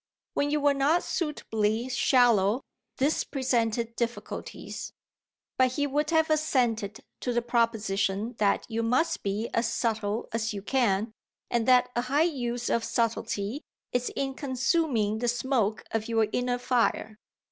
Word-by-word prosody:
When 285 - +1
you 300 +1 +1
were 290 0 +4
not 285 +5 +2
suitably 225 - -1
shallow 245 -4 +3 0.3
this 285 +4 +1
presented 235 -4 -1
difficulties; 235 0 -5 0.7
but 255 -1 +4
he 285 +2 0
would 295 +2 0
have 320 -1 +3
assented 240 -9 +1 0.2
to 250 - -2
the 240 0 0
proposition 220 -2 0
that 205 -2 +2
you 225 0 -2
must 260 +9 +1
be 205 +3 -2
as 230 - +1
subtle 220 -1 -1
as 225 -1 -1
you 200 - -6
can 220 -4 +1 0.4
and 235 -1 +1
that 250 -1 +5
a 240 - +2
high 275 +5 +2
use 245 -7 -2
of 230 - +1
subtlety 230 +1 -1 0.3
is 245 0 0
in 270 -1 -1
consuming 260 - 0
the 240 - -1
smoke 235 -3 0
of 220 -1 -1
your 225 -1 +3
inner 245 0 0
fire. 235 -3 0
240 Hz, 145 wpm, -28 LUFS, 220-265 Hz, 0.7 s, that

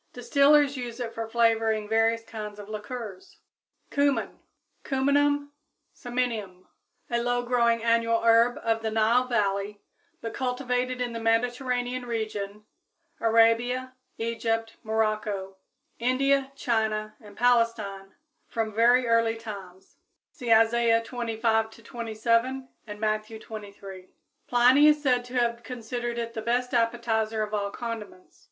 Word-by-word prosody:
Distillers 280 +3 +4
use 240 -1 -6
it 235 -2 -4
for 225 0 -4
flavoring 225 -2 +2
various 225 +1 +2
kinds 215 -2 -7
of 205 -1 -9
liquors. 230 - -7 0.5
=Cumin= 285 -1 0 0.4
(Cuminum 285 +1 +1 0.4
Cyminum, 245 0 -1
Linn.), 190 -5 -7 0.5
a 235 0 +1
low 245 0 0
growing 235 -2 +2
annual 230 0 +2
herb 230 +1 +5
of 225 -1 +1
the 220 - -1
Nile 225 +3 +2
valley, 205 -3 -1 0.4
but 230 - -6
cultivated 250 -1 -2
in 245 -1 -2
the 230 - -4
Mediterranean 245 +2 0
region, 210 -2 -4 0.5
Arabia, 230 +3 +2 0.2
Egypt, 225 0 -2
Morocco, 215 -3 -2 0.4
India, 270 +3 +2
China, 215 -4 -1
and 205 -2 -14
Palestine 230 -5 +1 0.3
from 220 -2 -3
very 240 +3 +4
early 230 -1 +2
times, 195 -4 -10 0.3
(See 240 -2 -4
Isaiah 230 +1 +5
xviii, 230 - -3 0.3
25 225 0 0
27 235 +3 -1 0.2
and 210 0 -8
Matthew 215 +1 -2
xxiii, - - -15 0.3
23.) 190 -2 -11 0.4
Pliny 250 +5 +6
is 300 0 +5
said 250 -3 +2
to 245 +1 -9
have 235 -1 +1
considered 240 0 -5
it 230 -1 -4
the 220 - -4
best 245 +3 -1
appetizer 225 -2 0
of 210 0 -6
all 200 -1 -1
condiments. 220 -4 -8
230 Hz, 130 wpm, -27 LUFS, 220-245 Hz, 0.5 s, Pliny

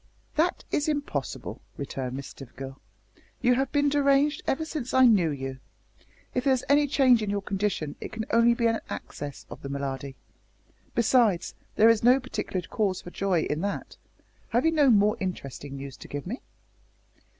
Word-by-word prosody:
"That 330 +4 +1
is 295 +1 +1
impossible," 290 -1 -3 0.2
returned 130 -2 -4
Miss 140 0 -6
Stivergill, 135 +1 -9 0.6
"You 250 -1 +4
have 265 +1 0
been 290 -1 +2
deranged 280 0 +3
ever 315 +4 0
since 295 -6 -4
I 260 0 +7
knew 200 -9 +5
you. 135 -2 -5 0.7
If 250 - 0
there 270 - +5
is 255 - -5
any 290 +1 +4
change 260 -4 +4
in 210 - -2
your 200 0 -1
condition 195 -7 -2
it - - -6
can 220 0 -4
only 235 +1 +5
be 235 - 0
an 225 -1 +2
access 145 -2 -7
of - - -9
the 140 - -6
malady. 140 -1 -4 0.8
Besides, 225 -6 +3 0.2
there 220 - +6
is 230 -2 +5
no 250 +3 +6
particular 195 -8 -4
cause 200 -5 -1
for 175 - -9
joy 190 -4 +1
in 150 +1 -2
that. 200 +1 -3 0.5
Have 240 +4 +2
you 325 - +5
no 295 -4 +4
more 210 0 +4
interesting 145 - -5
news 135 -1 -7
to - - -11
give 145 -1 -5
me?" 230 +9 -5
215 Hz, 175 wpm, -27 LUFS, -, 0.8 s, I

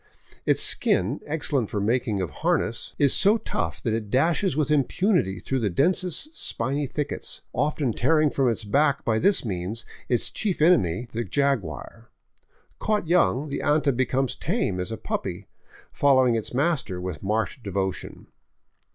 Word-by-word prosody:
Its - - +3
skin, 100 +11 +2
excellent 145 -6 -1
for 105 - -2
the 100 - -1
making 115 -3 0
of 90 - -5
harness, 115 - -1
is 140 -2 +3
so 205 +3 +4
tough 85 - -3
that 115 - 0
it 110 -2 -3
dashes 165 - +1
with 150 -1 +1
impunity 150 - +1
through 135 - -2
the 110 -4 0
densest 180 - 0
spiny 135 +4 -2
thickets, 145 +2 -4
often 145 -2 0
tearing 155 +5 +2
from 135 -3 +2
its 115 - -2
back 140 +6 +1
by 110 -1 +2
this 195 - +2
means 100 +3 -4 0.2
its 120 - +2
chief 205 -5 -2
enemy, 125 - +3
the 115 0 -2
jaguar. 115 - -2 0.7
Caught 210 -5 0
young, 150 - +3
the 140 - -3
anta 145 -2 +2
becomes 130 +1 0
as - - -6
tame 95 -2 -1
as 90 +3 -3
a 110 - -4
puppy, - - -4 0.5
following 130 -3 +4
its 115 -2 -2
master 135 - 0
with 90 -3 -5
marked 110 +5 -1
devotion. 95 -2 -4
130 Hz, 160 wpm, -25 LUFS, 105-150 Hz, 0.7 s, so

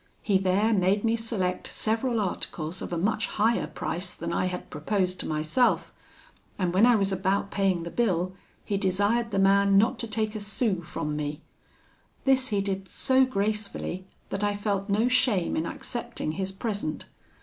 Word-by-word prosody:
He 195 -3 +3
there 195 +4 +2
made 195 +1 +2
me 225 0 +2
select 220 -6 -2
several 230 +2 0
articles 180 -3 -3
of - - -5
a 175 - -1
much 215 +5 0
higher 225 +3 +1
price 180 +2 -4
than 170 +1 -4
I - - +1
had 180 0 -5
proposed 185 +3 -1
to - - -3
myself; 155 +11 +1 0.6
and 180 -3 0
when 205 +6 +6
I 245 - +6
was 195 -2 +1
about 195 +1 0
paying 190 -4 +1
the 170 - -6
bill, 185 -6 0 0.3
he 200 - 0
desired 205 +5 +1
the 200 - -2
man 195 0 +5
not 225 +4 +3
to 230 - -3
take 215 0 0
a 215 - -4
sou 205 -2 0
from 165 -3 -4
me. 150 +1 -4 0.8
This 265 -1 +3
he 205 -4 0
did 195 -1 -3
so 260 +7 +3
gracefully, 200 -4 -2 0.2
that 195 +1 -2
I 205 0 +1
felt 205 -1 -2
no 215 +4 +3
shame 250 -8 +2
in 160 +1 -1
accepting 240 -9 -4
his 190 +3 -2
present. 200 -5 -3
200 Hz, 175 wpm, -27 LUFS, 185-220 Hz, 0.8 s, when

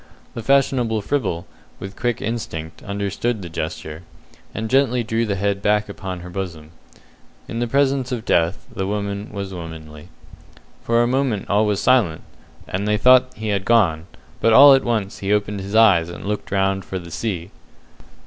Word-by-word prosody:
The 115 - -5
fashionable 125 -4 +2
fribble, 100 -12 -2 0.3
with 95 +1 -8
quick 120 -2 -2
instinct, 80 -8 -5
understood 100 +2 -3
the 85 - -7
gesture, 80 0 -5 0.5
and 110 0 -4
gently 125 -1 +2
drew 115 +1 -1
the 100 - -1
head 100 +1 -1
back 105 +1 +2
upon 95 -3 -6
her 90 - -9
bosom. 85 -5 -6 0.8
In 115 - -4
the 120 - 0
presence 135 0 +1
of 120 -2 -4
death 85 0 +1
the 95 -1 -2
woman 100 0 -3
was 100 -2 -5
womanly. 80 -3 -9 0.8
For 115 0 +2
a - - +1
moment 125 -5 0
all 105 +2 +3
was 105 -2 0
silent, 110 -12 +2 0.4
and 100 +3 -3
they 105 0 +2
thought 130 +3 +5
he 110 0 -4
had 100 -2 0
gone; 90 -8 +2 0.3
but 115 - +3
all 140 +4 +10
at 135 - +3
once 110 -5 -2
he 100 0 -2
opened 105 -1 0
his 100 +2 -5
eyes 95 -7 +5
and 85 - -9
looked 105 +1 -3
round 95 -1 0
for 95 - -5
the 85 -2 -9
sea. 90 +1 -4
100 Hz, 175 wpm, -21 LUFS, 95-115 Hz, 0.8 s, all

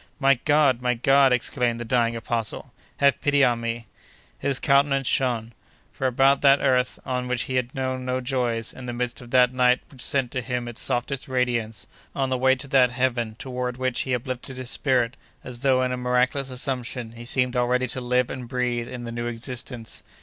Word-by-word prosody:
"My 135 -3 +4
God! 145 -4 +4
my 125 0 +1
God!" 135 +3 +4
exclaimed 125 -1 0
the 120 - -5
dying 115 0 +1
apostle, 115 -1 -3 0.2
"have 140 -1 +3
pity 145 -1 +3
on 120 -2 +2
me!" 115 0 -3 0.5
His 140 -2 0
countenance 140 -1 +3
shone. 120 -3 0 0.4
Far 130 - -1
above 135 +2 +3
that 140 0 +6
earth 125 -1 +1
on 125 -1 -2
which 125 -1 0
he 130 - -5
had 125 -1 -1
known 130 -1 -2
no 130 0 -1
joys; 120 -3 -1
in 130 -1 -9
the 120 - -3
midst 120 +1 -3
of 120 - -12
that 125 0 +4
night 125 0 +4
which 130 -3 -12
sent 135 -3 0
to 125 - -2
him 120 0 -3
its 120 0 -5
softest 130 +3 -1
radiance; 120 -4 -1 0.3
on 135 -1 0
the 130 - 0
way 130 +1 +4
to 140 +1 -6
that 130 -2 +5
heaven 120 -3 -1
toward 125 -1 -4
which 130 -1 0
he 130 -1 0
uplifted 130 +1 -5
his 130 0 -4
spirit, 130 -1 +1 0.3
as 125 -2 -5
though 130 -1 +3
in 125 - 0
a 125 - -2
miraculous 125 +2 +1
assumption, 125 -2 -3
he 115 0 -10
seemed 125 +1 +1
already 125 +1 +2
to 130 +1 -3
live 125 +1 +1
and 125 -2 -6
breathe 120 -1 -2
in 125 -1 -7
the 115 - -6
new 120 0 -3
existence. 120 0 -4
125 Hz, 200 wpm, -24 LUFS, 120-130 Hz, 0.5 s, that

